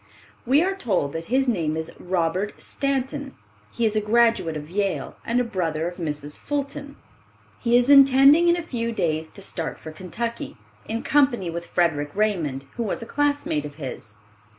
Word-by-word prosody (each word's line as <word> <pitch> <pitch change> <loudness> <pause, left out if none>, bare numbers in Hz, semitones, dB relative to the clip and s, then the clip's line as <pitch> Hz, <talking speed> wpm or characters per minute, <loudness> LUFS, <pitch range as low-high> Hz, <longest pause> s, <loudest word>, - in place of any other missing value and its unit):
We 280 +6 +5
are 385 +2 0
told 190 - -1
that 165 0 -4
his 265 +5 +1
name 165 -9 0
is 160 0 -4
Robert 180 +2 -1
Stanton. 275 0 -2 0.4
He 235 - -1
is 215 -1 +1
a 215 - +2
graduate 225 -7 +2
of 150 0 -8
Yale 195 +2 -2
and 235 +2 0
a - - +2
brother 170 -8 -2
of 175 - -6
Mrs. 150 -3 -4
Fulton, 285 0 -4 0.6
He 235 +1 +3
is 245 0 +3
intending 275 +4 +7
in 345 0 +4
a 345 - -3
few 235 -7 -3
days 160 -6 -1
to 200 - -10
start 165 -4 -4
for 155 - -9
Kentucky, 220 - -5 0.3
in 225 +1 -3
company 255 -11 +2
with 170 +1 -6
Frederic 150 -4 +1
Raymond, 170 -11 0
who - - -2
was 225 +3 -3
a - - -7
classmate 285 - 0
of 145 -1 -8
his. 125 -7 -8
210 Hz, 175 wpm, -24 LUFS, 160-265 Hz, 0.6 s, intending